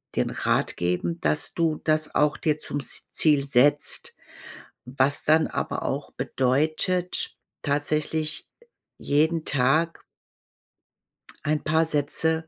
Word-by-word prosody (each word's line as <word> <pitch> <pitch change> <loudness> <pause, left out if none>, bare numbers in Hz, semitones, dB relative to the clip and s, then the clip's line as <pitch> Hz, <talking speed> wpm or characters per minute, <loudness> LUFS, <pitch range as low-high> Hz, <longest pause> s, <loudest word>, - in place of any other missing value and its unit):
den - - +1
Rat - - 0
geben, 90 - -2
dass 150 - -1
du 165 -2 0
das 155 0 +1
auch 150 0 +3
dir 150 -1 0
zum 145 - -4
s 140 - -6
Ziel 145 -3 +3
setzt, 140 +3 +2 0.7
was 130 +3 +1
dann 160 +1 +4
aber - - -3
auch - - -3
bedeutet, 155 +7 -1 0.2
tatsächlich 155 +2 -2 0.5
jeden 160 +3 +1
Tag 145 +5 +1 1.4
ein 150 0 0
paar 160 +1 +2
Sätze, 160 +2 0
150 Hz, 110 wpm, -25 LUFS, 145-160 Hz, 1.4 s, dann